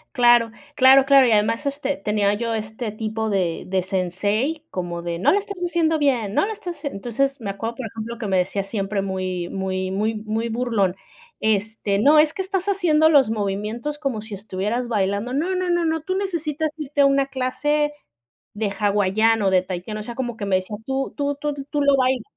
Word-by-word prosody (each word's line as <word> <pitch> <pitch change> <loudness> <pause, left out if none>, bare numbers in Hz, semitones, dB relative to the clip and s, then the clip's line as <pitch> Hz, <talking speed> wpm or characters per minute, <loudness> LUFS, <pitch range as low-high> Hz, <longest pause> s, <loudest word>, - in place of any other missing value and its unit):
Claro, 240 -2 +5 0.2
claro, 265 0 +7
claro, 275 -2 +6
y - - +2
además 225 +5 +2
este 280 0 -2
tenía 205 0 +1
yo 230 +2 -2
este 220 +1 -4
tipo 220 +1 -3
de 185 -5 -1
de 185 0 0
sensei 205 - -1
como 175 -2 -4
de: 170 -1 -3
"¡No 185 - +4
lo 395 - +4
estás 400 -2 -5
haciendo 330 -2 +1
bien, 245 -8 +1
no - - +3
lo - - -3
estás 360 -5 -7
haciendo!". 285 -9 -5
Entonces, 270 +6 -1
me 205 -4 -3
acuerdo, 225 +4 -5
por 255 - -6
ejemplo, 225 +2 -6
que 230 - -5
me 190 -1 +1
decía 195 +2 -1
siempre 195 0 -2
muy 185 -2 -3
muy 190 -1 -2
muy 215 +3 0
muy 215 +2 -3
burlón: 225 -6 0 0.4
"Este, 210 -1 0
no, 290 +8 +5
es 305 0 +5
que - - -3
estás 380 -1 -2
haciendo 340 -6 +3
los 280 -7 +5
movimientos 215 +7 -3
como 270 -7 -2
si 220 0 -9
estuvieras 210 +4 -3
bailando. 205 +1 -1
No, 330 +7 0
no, 365 0 -1
no, 345 -1 +2
no, 320 0 0
tú 370 +4 -3
necesitas 320 -6 -2
irte 295 -1 -1
a - - +6
una 275 0 +3
clase 295 +3 0 0.6
de 210 -1 -2
hawaiano, 205 +1 +2
de 185 -1 +4
tahitiano", 185 +3 -5
o - - -7
sea, 235 +2 -7
como 240 -3 -3
que 205 - -4
me 195 -1 +1
decía 185 +3 -5
tú 270 0 -2
tú 285 0 -1
tú 295 +1 -3 0.2
tú 295 - 0
lo 280 -1 +5
bailas. 255 -1 +1
230 Hz, 205 wpm, -22 LUFS, 200-285 Hz, 0.6 s, claro